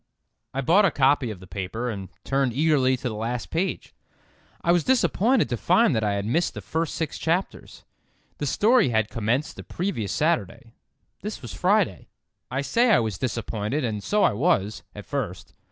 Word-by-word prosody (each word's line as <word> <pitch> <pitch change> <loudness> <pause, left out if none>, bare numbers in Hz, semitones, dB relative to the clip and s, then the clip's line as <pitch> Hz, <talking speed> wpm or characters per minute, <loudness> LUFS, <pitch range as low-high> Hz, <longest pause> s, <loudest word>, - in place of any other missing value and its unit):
I 135 - -2
bought 175 +10 +4
a 195 - +5
copy 135 -3 +2
of 105 -4 -7
the 95 - -12
paper, 95 +6 -4
and 95 -4 -7
turned 135 -3 0
eagerly 135 -2 +3
to 130 +1 -4
the 115 - -3
last 115 +3 -4
page. 180 +4 -2 0.7
I 170 - +3
was 175 -2 +3
disappointed 255 -1 +2
to 120 - -1
find 180 - +3
that 110 - 0
I 105 -1 +1
had 100 0 -2
missed 160 +10 0
the - - -6
first 160 -1 -2
six 160 -3 -3
chapters. 175 +4 -3 0.5
The 145 - -2
story 220 - +4
had 110 -2 +1
commenced 120 +8 -1
the - - -8
previous 170 - -3
Saturday; 120 - -1 0.5
this - - -6
was - - -7
Friday. - - +1 0.4
I 130 - -1
say 235 - +2
I 220 - +6
was 110 -6 -2
disappointed 115 +2 -2
and 110 -4 -2
so 210 - +1
I - - +4
was, 105 - +1
at - - -9
first. - - -4
130 Hz, 185 wpm, -25 LUFS, 110-170 Hz, 0.7 s, I